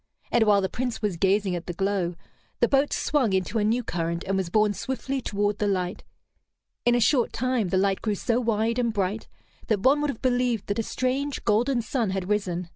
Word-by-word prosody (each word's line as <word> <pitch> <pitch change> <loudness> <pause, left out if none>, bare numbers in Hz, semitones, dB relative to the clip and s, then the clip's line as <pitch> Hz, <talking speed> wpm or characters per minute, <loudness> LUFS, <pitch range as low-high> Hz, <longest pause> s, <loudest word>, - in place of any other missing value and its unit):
And 235 -2 +4
while 205 -1 +5
the 190 - 0
Prince 245 +1 -4
was 205 -4 0
gazing 195 +1 +1
at 175 - -6
the 175 - -3
glow, 195 -2 -1 0.4
the - - +4
boat 275 +1 +2
swung 260 -9 +1
into 190 +4 0
a - - +1
new 230 +4 +1
current, 170 -2 -2
and 195 0 -1
was 190 -3 -1
borne 210 +2 +3
swiftly 265 +3 -3
toward 205 -2 -1
the 210 - +1
light. 185 -1 -2 0.8
In 240 - +5
a - - +3
short 240 +2 +3
time 250 -6 0
the 185 - +1
light 195 0 +1
grew 215 -2 0
so 230 +4 0
wide 225 +1 0
and 235 -2 +1
bright 205 +1 -2 0.4
that 210 -3 +1
one 275 +6 +4
would 295 - 0
have 255 - -5
believed 245 -4 +1
that 205 - -1
a - - +1
strange, 260 +4 -2
golden 235 +3 +2
sun 230 -3 -1
had 190 0 -3
risen. 180 -4 -1
215 Hz, 215 wpm, -26 LUFS, 195-245 Hz, 0.8 s, while